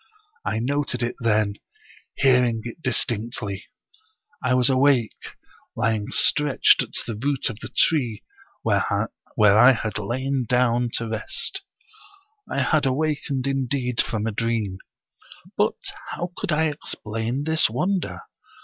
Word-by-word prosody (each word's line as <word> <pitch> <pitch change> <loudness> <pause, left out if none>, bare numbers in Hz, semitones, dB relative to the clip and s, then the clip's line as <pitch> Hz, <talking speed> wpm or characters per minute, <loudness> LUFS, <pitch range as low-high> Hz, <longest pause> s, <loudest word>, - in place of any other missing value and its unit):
I 110 - -1
noted 140 +3 -1
it 120 +1 -2
then, 105 -3 +1 0.6
hearing 125 -4 +3
it 120 +7 -8
distinctly. 115 -5 -1 0.8
I 125 0 +2
was 125 -1 +3
awake, 130 -3 +1 0.4
lying 110 -2 0
stretched 150 -2 +4
at - - -6
the 115 - -4
root 140 -4 0
of 110 - -11
the - - -8
tree 125 -10 +1 0.4
where - - +2 0.6
I 110 +5 +7
had 110 -3 -3
lain 130 +4 -2
down 125 -1 +2
to 115 - -2
rest. 110 0 -3 0.9
I - - 0
had 155 -4 +2
awakened 140 -1 -1
indeed 130 -2 0
from 110 -2 -3
a 115 - 0
dream, 110 -3 -2 0.8
but - - +2 0.3
how 175 +1 -4
could 205 - -3
I 155 +1 +2
explain 120 -4 -3
this 160 -3 +3
wonder? 125 - -1
125 Hz, 125 wpm, -24 LUFS, 110-140 Hz, 0.9 s, I